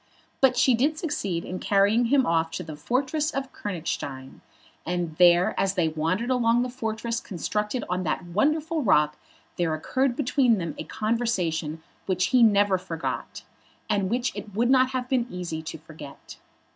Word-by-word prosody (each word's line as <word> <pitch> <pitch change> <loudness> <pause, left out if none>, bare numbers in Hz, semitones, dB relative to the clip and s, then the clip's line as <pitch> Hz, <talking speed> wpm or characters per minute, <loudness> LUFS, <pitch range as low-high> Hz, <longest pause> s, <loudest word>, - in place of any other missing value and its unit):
But 265 -2 +4
she 260 - +4
did 285 +7 +1
succeed 205 - -2
in 185 - -5
carrying 205 +4 +3
him 265 +2 +3
off 165 -1 +1
to 180 - -4
the 155 -2 -8
fortress 270 - -1
of 270 -3 -4
Königstein; 150 -8 -5 0.4
and 175 -2 -3
there 175 0 +5
as 195 0 +1
they 170 -4 +2
wandered 165 +10 -1
along 240 -1 +3
the 250 - -4
fortress 230 -1 -3
constructed 210 +5 -3
on 180 +1 -1
that 175 +1 -2
wonderful 305 - 0
rock 150 - +3 0.4
there 165 -2 +1
occurred 255 - 0
between 250 -3 +2
them 170 -4 -3
a - - -5
conversation 180 -9 -1 0.2
which 185 -1 +1
he 250 - +6
never 205 -4 +4
forgot, 170 -3 -5 0.5
and 200 -2 +1
which 245 +3 -1
it 205 -2 -8
would 240 +3 +2
not 260 -1 +5
have 255 -1 -3
been 250 -2 +1
easy 175 -4 -5
to 160 0 -7
forget. 150 -3 -12
205 Hz, 165 wpm, -26 LUFS, 170-250 Hz, 0.5 s, he